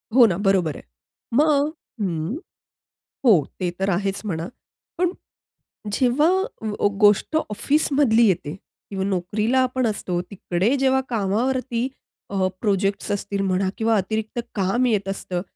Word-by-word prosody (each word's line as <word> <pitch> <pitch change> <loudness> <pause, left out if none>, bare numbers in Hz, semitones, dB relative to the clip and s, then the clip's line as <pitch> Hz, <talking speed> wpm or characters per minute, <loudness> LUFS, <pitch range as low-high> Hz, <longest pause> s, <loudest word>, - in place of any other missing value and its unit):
हो 250 -2 +9
ना, 185 -5 +1
बरोबर 190 -7 +1
आहे. - - -10 0.5
मग 295 +2 +3 0.3
हं. 175 - -2 0.9
हो. 225 - +8 0.3
ते 180 - 0
तर 195 +1 0
आहेच 195 +2 -1
म्हणा. 170 -3 -3 0.5
पण 360 -1 +2 0.8
जेव्हा 260 +8 +3 0.8
गोष्ट 205 +9 +3
अ, - - +5
ऑफिसमधली 275 -1 +3
येते 175 -4 -1 0.3
किंवा 195 -1 -2
नोकरीला 205 +6 0
आपण 255 -1 0
असतो. 180 -4 -2
तिकडे 195 +5 0
जेव्हा 265 0 +3
कामावरती 240 +3 0 0.4
अ, 190 -2 +1
प्रोजेक्ट्स 200 -2 0
असतील 200 0 -2
म्हणा 190 0 +1
किंवा 225 0 +2
अतिरिक्त 220 +4 -2 0.2
काम 200 +6 +1
येत 210 -5 +1
असतं 185 -2 -3
205 Hz, 125 wpm, -23 LUFS, 190-250 Hz, 0.9 s, हो